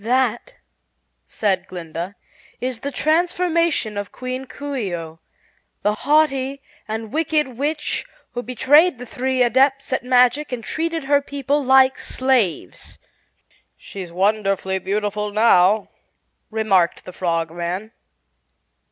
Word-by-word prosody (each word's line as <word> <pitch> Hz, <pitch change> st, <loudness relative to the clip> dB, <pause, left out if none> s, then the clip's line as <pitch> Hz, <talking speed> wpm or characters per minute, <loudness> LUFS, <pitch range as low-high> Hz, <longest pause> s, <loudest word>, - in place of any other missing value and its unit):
"That," 240 Hz, 0 st, 0 dB, 0.7 s
said 190 Hz, -3 st, -1 dB
Glinda, 175 Hz, +2 st, -6 dB, 0.4 s
"is 250 Hz, -2 st, -3 dB
the 280 Hz, -, -4 dB
transformation 335 Hz, -, +1 dB
of 205 Hz, -, -6 dB
Queen 255 Hz, +1 st, -5 dB
Coo 285 Hz, +1 st, -6 dB
ce 205 Hz, -8 st, -2 dB
oh, 165 Hz, -1 st, -8 dB, 0.6 s
the 210 Hz, -, +2 dB
haughty 275 Hz, +1 st, +1 dB, 0.3 s
and 220 Hz, +1 st, -5 dB
wicked 305 Hz, -2 st, +1 dB
witch 295 Hz, +5 st, -2 dB, 0.3 s
who 245 Hz, -, -4 dB
betrayed 265 Hz, +6 st, +4 dB
the 250 Hz, -, -8 dB
three 255 Hz, +1 st, 0 dB
Adepts 270 Hz, +3 st, +2 dB
at 260 Hz, -, -1 dB
Magic 250 Hz, +3 st, +3 dB
and 245 Hz, -2 st, -4 dB
treated 330 Hz, +4 st, -2 dB
her 285 Hz, +1 st, +3 dB
people 285 Hz, +1 st, -1 dB
like 265 Hz, 0 st, +5 dB
slaves." 235 Hz, -, -1 dB, 0.8 s
"She's 185 Hz, -4 st, -9 dB
wonderfully 195 Hz, 0 st, 0 dB
beautiful 210 Hz, +2 st, -2 dB
now," 205 Hz, -1 st, +4 dB, 0.6 s
remarked 200 Hz, -6 st, +1 dB
the 185 Hz, -, -9 dB
Frogman. 175 Hz, +4 st, -2 dB
245 Hz, 115 wpm, -21 LUFS, 200-275 Hz, 0.8 s, like